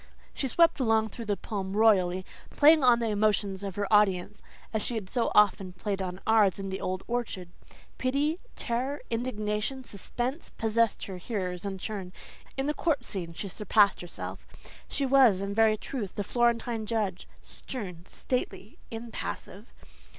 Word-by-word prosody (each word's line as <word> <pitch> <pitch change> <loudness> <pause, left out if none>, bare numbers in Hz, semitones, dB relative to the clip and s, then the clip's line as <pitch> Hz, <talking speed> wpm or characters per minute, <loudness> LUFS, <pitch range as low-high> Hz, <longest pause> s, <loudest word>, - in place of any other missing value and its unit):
She 270 - -1
swept 335 +5 +4
along 220 -3 +2
through 230 +3 -8
the 205 -2 0
poem 195 -2 -4
royally, 185 -4 +4 0.2
playing 305 0 +6
on 245 -2 +7
the 230 -1 -1
emotions 205 -2 +1
of 195 -2 -5
her 205 - -1
audience 205 -1 +3 0.3
as 220 - 0
she 240 - -2
had 200 -4 -5
so 240 -2 +1
often 195 -3 +4
played 195 +1 -3
on 185 0 -4
ours 215 -4 +4
in 195 -1 -5
the 190 - -4
old 185 0 -2
orchard. 230 -7 -3 0.5
Pity, 285 +6 +1 0.2
terror, 260 +4 -2
indignation, 230 +1 -2
suspense, 245 - -4
possessed 225 0 +1
her 190 -2 -6
hearers 180 -2 -4
in 195 -1 -3
turn. 190 -2 -5 0.4
In 270 - 0
the 300 - +1
court 295 -6 0
scene 175 -6 -5
she 200 - -5
surpassed 205 +1 +3
herself. 175 - -7 0.4
She 280 - -1
was, 260 -7 +6
in 200 +1 -3
very 220 0 +4
truth, 215 -4 -5
the 205 - -1
Florentine 235 0 0
judge, 205 -5 -2 0.2
stern, 185 -10 -7
stately, 215 -5 -4
impassive. 225 -2 -6
215 Hz, 160 wpm, -29 LUFS, 195-240 Hz, 0.5 s, on